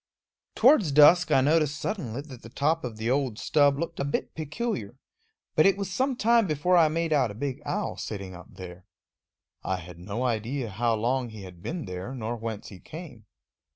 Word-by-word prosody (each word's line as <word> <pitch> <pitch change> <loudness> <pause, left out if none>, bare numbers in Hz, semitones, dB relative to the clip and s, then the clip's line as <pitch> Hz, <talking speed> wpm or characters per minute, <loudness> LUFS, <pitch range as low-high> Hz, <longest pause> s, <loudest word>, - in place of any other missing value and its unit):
Towards 230 - +5
dusk 150 +5 +7
I 130 - +5
noticed 150 +1 +2
suddenly 140 - -3
that 135 -5 -12
the 115 - -11
top 155 +6 0
of 120 -4 -5
the 115 +2 -1
old 130 -5 0
stub 145 +1 +3
looked 170 +3 -4
a - - 0
bit 140 - -2
peculiar, 160 +10 -4 0.6
but - - +5
it 195 - +3
was 195 -2 -4
some 260 +6 0
time 230 -2 +3
before 155 +4 +2
I 165 -3 +6
made 165 +1 0
out 135 -5 +3
a 105 - -8
big 130 +2 -4
owl - - -2
sitting 95 -3 -6
up 90 0 -11
there. 90 -1 -10 0.8
I 95 - -1
had 90 -1 -11
no 100 +7 -4
idea 120 +1 -2
how 115 +3 +1
long 120 +3 0
he 110 -2 -10
had 90 -2 -12
been 165 - -4
there, 90 +7 -6
nor 120 -1 -3
whence 115 -2 -6
he 95 - -11
came. 135 - -11
135 Hz, 195 wpm, -27 LUFS, 110-160 Hz, 0.8 s, dusk